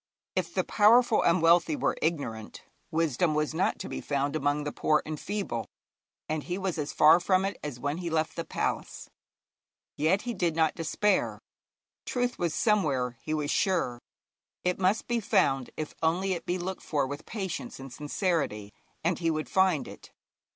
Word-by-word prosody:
If - - -1
the - - +2
powerful 230 +2 +5
and 170 0 +3
wealthy 165 -1 +5
were - - 0
ignorant, 130 -10 -3 0.3
wisdom 160 0 +1
was 150 0 0
not 175 +4 +1
to - - -6
be - - -5
found 140 +1 -1
among 145 0 0
the 145 - -3
poor 155 -1 +1
and 155 -1 -5
feeble, 195 - -3 0.6
and 155 0 -1
he 180 +4 -4
was 190 -4 -2
as 150 -1 -2
far 155 +3 +6
from 185 +1 +2
it 200 - -2
as 145 -5 -5
when 145 +5 -2
he 175 -2 -3
left 160 -1 0
the 165 - -3
palace. - - -3 0.8
Yet 165 +7 +2
he 240 - -3
did 170 -6 0
not 160 -1 +3
despair. 185 +5 0 0.7
Truth 245 -1 -1
was 170 -3 0
somewhere, 140 - +1
he 155 - -2
was 150 -1 -1
sure; 170 - +1 0.6
it 180 0 0
must 195 +4 +1
be 240 -1 +1
found 185 - +2
if 155 -1 -4
only 180 +4 +1
it 170 -2 -6
be 180 - 0
looked 185 +1 -4
for 145 -3 0
with 145 +3 -7
patience 200 - -5
and 135 -1 -9
sincerity, 145 - -2 0.3
and 170 +1 +1
he 165 -1 +1
would 155 -1 -2
find 190 -6 +2
it. - - -12
165 Hz, 180 wpm, -28 LUFS, 150-190 Hz, 0.8 s, far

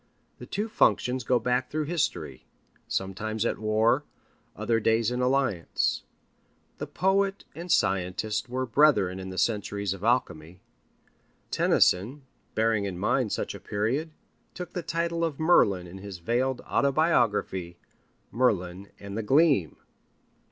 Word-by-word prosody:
The - - -9
two 210 +2 -2
functions 130 - +2
go 125 +2 +2
back 125 +2 0
through 155 +1 -1
history, 150 - -3 0.4
sometimes 105 +4 -2
at - - -1
war, 110 +2 +2 0.5
other 115 -1 0
days 115 +1 +2
in 125 0 -2
alliance. 125 -9 0 0.8
The - - -4
poet 195 +1 0
and 170 +2 -8
the - - +4
scientist 95 +5 0
were 130 +1 -2
brethren 115 -9 +3
in 95 0 -6
the 95 - -8
centuries 100 -3 -1
of 95 0 -10
alchemy. 90 -8 -1 0.9
Tennyson, 120 +11 +2 0.3
bearing 110 -2 +1
in 95 -3 -4
mind 105 +4 0
such - - -2
a - - -9
period, 120 +10 -2 0.5
took 180 -1 -7
the 180 - -3
title 170 0 -2
of 160 -4 -2
Merlin 100 - +4
in 90 +2 -10
his 100 -1 -8
veiled 120 +8 -1
autobiography, 120 - +1 0.5
Merlin 100 -5 0
and 100 0 -8
the 110 - -1
Gleam. 135 - +3
115 Hz, 135 wpm, -27 LUFS, 95-140 Hz, 0.9 s, the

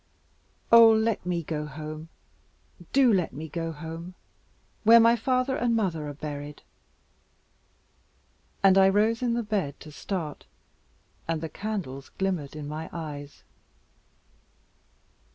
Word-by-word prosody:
Oh 230 -1 +9
let 220 -3 +1
me 175 -2 -1
go 150 -1 -4
home, 155 +2 -8 0.8
do 260 -4 +5
let 180 -4 0
me 155 +4 -6
go 165 +1 -4
home, 165 +3 -8 0.7
where 230 +2 +8
my 230 +1 +6
father 255 +2 0
and 240 -2 +1
mother 170 -9 -1
are - - -6
buried." 145 0 -7 2.0
And 195 0 +6
I 190 0 +6
rose 215 +4 +2
in 240 -2 +1
the 235 - -1
bed 195 -10 -2
to 155 - -11
start, 160 -1 -5 0.8
and 165 -1 -1
the 160 0 -5
candles 175 -9 -5
glimmered 180 -7 -2
in 150 -1 -6
my 155 +2 -6
eyes. 145 -3 -8
170 Hz, 125 wpm, -27 LUFS, 150-220 Hz, 2.0 s, Oh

